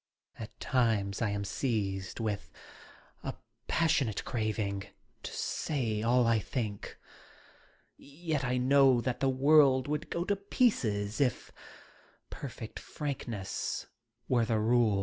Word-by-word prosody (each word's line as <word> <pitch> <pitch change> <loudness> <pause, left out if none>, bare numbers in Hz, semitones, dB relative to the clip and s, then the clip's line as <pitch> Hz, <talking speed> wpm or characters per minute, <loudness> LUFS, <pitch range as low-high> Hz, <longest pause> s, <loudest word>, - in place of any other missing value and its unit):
At - - -9
times 110 -6 +1
I 115 - +2
am 100 0 -2
seized 95 -6 -2
with 105 -3 -3 0.7
a - - -4 0.3
passionate 150 -10 +1
craving 105 -3 -2 0.4
to - - -6
say 115 -8 -1
all 120 +2 +3
I 115 -1 +3
think 105 -3 -4 1.0
Yet 150 0 -4
I 125 -1 0
know 135 0 +5
that 125 +1 -2
the 135 - +2
world 135 -1 +5
would 150 +1 -2
go 170 - -1
to 200 - +1
pieces 125 - +1
if 125 -3 0 0.8
perfect - - -7
frankness 120 -9 -4 0.4
were 120 -2 +3
the 110 0 +1
rule. 110 -2 +3
120 Hz, 120 wpm, -31 LUFS, 105-140 Hz, 1.0 s, know